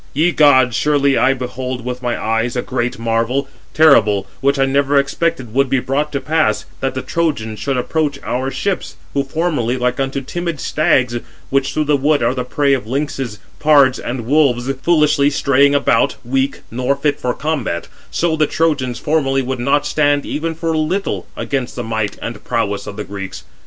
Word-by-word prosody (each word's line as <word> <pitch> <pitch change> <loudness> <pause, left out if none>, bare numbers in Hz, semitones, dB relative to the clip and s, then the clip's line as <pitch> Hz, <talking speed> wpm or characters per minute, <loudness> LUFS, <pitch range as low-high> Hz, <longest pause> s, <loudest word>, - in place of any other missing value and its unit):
Ye 165 +5 +3
gods, 130 -7 +5
surely 140 -2 +2
I 135 +1 +3
behold 125 -1 -5
with 125 0 -4
my 120 -1 -2
eyes 115 +2 -1
a 125 - -1
great 125 -1 -2
marvel, 115 +4 0 0.3
terrible, 110 -11 +5
which 140 +2 +2
I 135 - +3
never 140 +1 +2
expected 140 -3 0
would 135 +1 +2
be 135 - +2
brought 140 +4 -1
to 140 - 0
pass, 155 -8 0
that 135 -1 -2
the 130 - -3
Trojans 145 -11 -2
should 135 -2 -1
approach 145 +2 -1
our 130 +2 -2
ships; 195 +7 -3 0.2
who 140 - +1
formerly, 135 -5 -1
like 125 +1 -1
unto 135 0 -1
timid 170 +2 -4
stags, 130 -7 +1 0.3
which 135 0 +1
through 155 - 0
the 150 0 +2
wood 145 0 +2
are 115 - +2
the 125 -1 -2
prey 140 +2 +1
of 125 -5 -1
lynxes, 135 -3 -3 0.2
pards, 140 -4 +5
and 120 -1 -4
wolves, 130 -3 +2
foolishly 150 -2 +3
straying 140 0 +3
about, 140 -4 +2
weak, 135 +2 -1
nor 125 +4 0
fit 145 +1 -1
for 125 -1 -1
combat: 140 - -2 0.2
so 170 -2 0
the 155 -1 +2
Trojans 140 -8 0
formerly 135 -3 +1
would 130 0 -3
not 140 +4 +1
stand 145 -1 +1
even 165 +2 -3
for 165 0 -2
a 160 - +1
little 185 +6 -2
against 130 -3 -3
the 120 - -4
might 110 -2 -2
and 115 -2 -6
prowess 100 -3 -2
of 105 - -6
the 105 - -3
Greeks. 95 -1 -7
135 Hz, 185 wpm, -18 LUFS, 125-150 Hz, 0.3 s, gods